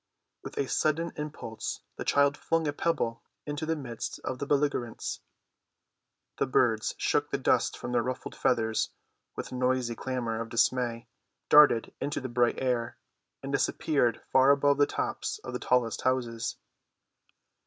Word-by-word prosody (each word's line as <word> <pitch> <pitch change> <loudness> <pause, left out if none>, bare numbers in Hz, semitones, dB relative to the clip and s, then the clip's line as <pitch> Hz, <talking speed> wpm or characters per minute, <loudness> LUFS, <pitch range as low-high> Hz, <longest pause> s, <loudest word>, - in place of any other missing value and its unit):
With - - -8
a 140 - 0
sudden 160 +4 +1
impulse 150 -7 -5 0.2
the - - -4
child 140 0 +3
flung 165 +1 0
a 145 - 0
pebble 145 -8 -1 0.2
into 145 +1 -4
the 160 - +1
midst 120 -6 -5
of 130 - -4
the 140 - -3
belligerents. 140 -5 -1 1.2
The - - +1
birds - - +2
shook - - +1
the - - -1
dust - - +1
from 120 - -5
their 120 -1 +2
ruffled 130 +1 -4
feathers 110 -3 +1 0.5
with - - -6
noisy 125 -1 0
clamor 115 -2 -3
of 115 - -5
dismay, 120 0 +1 0.4
darted 145 -6 +6
into 145 - -1
the 130 - -5
bright 120 0 +2
air, 125 -2 -1 0.5
and 135 - -4
disappeared 140 -3 +1
far 130 +1 +6
above 140 0 +4
the 145 - +5
tops - - -2
of - - -6
the - - -2
tallest 125 -3 +1
houses. 120 -3 -1
130 Hz, 150 wpm, -29 LUFS, 120-145 Hz, 1.2 s, darted